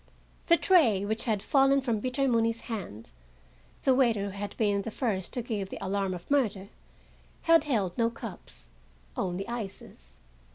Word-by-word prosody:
The 340 - +6
tray, 245 - +4
which 220 +2 -2
had 215 -4 0
fallen 275 0 +4
from 235 -6 -1
Peter 255 +3 0
Mooney's 230 -2 +1
hand,—the 60 - -5
waiter 235 -6 +2
who 200 - -3
had 200 +1 -6
been 205 -2 +1
the 210 - -5
first 210 -6 -2
to 245 - -2
give 210 -5 -3
the - - -6
alarm 195 -1 -1
of 175 +9 -11
murder,—had 275 +7 -1
held 205 -11 0
no 230 0 +3
cups, 200 - -9 0.5
only 185 +2 -2
ices. 195 - -7
215 Hz, 150 wpm, -29 LUFS, 190-245 Hz, 0.5 s, The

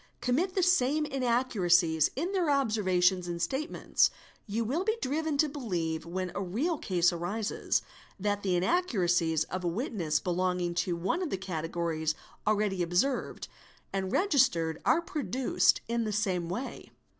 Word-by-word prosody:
commit 285 +10 0
the 375 - +2
same 305 -4 +3
inaccuracies 200 - +2
in 335 +8 -2
their 365 -5 +1
observations 190 -9 +2
and 170 -1 -4
statements, 265 - +1 0.4
you 225 +3 -1
will 295 - 0
be 440 +3 0
driven 305 - -1
to 305 - +4
believe, 175 - -3
when 185 +1 -3
a 200 - -3
real 265 - -1
case 175 -2 +2
arises, 200 +6 -1 0.4
that 205 +1 -1
the 190 -3 0
inaccuracies 175 - +2
of 185 0 -5
a - - 0
witness 170 - -1
belonging 180 -1 -1
to 175 0 0
one 185 - -1
of 355 - -2
the 195 - -2
categories 165 -3 -2 0.3
already 205 -3 +1
observed 175 +10 0 0.5
and 190 -1 -2
registered 245 - +2
are 340 - +3
produced 255 - +1
in 235 0 0
the 215 - -2
same 190 -5 -1
way. 240 +9 -5
200 Hz, 145 wpm, -30 LUFS, 175-270 Hz, 0.5 s, to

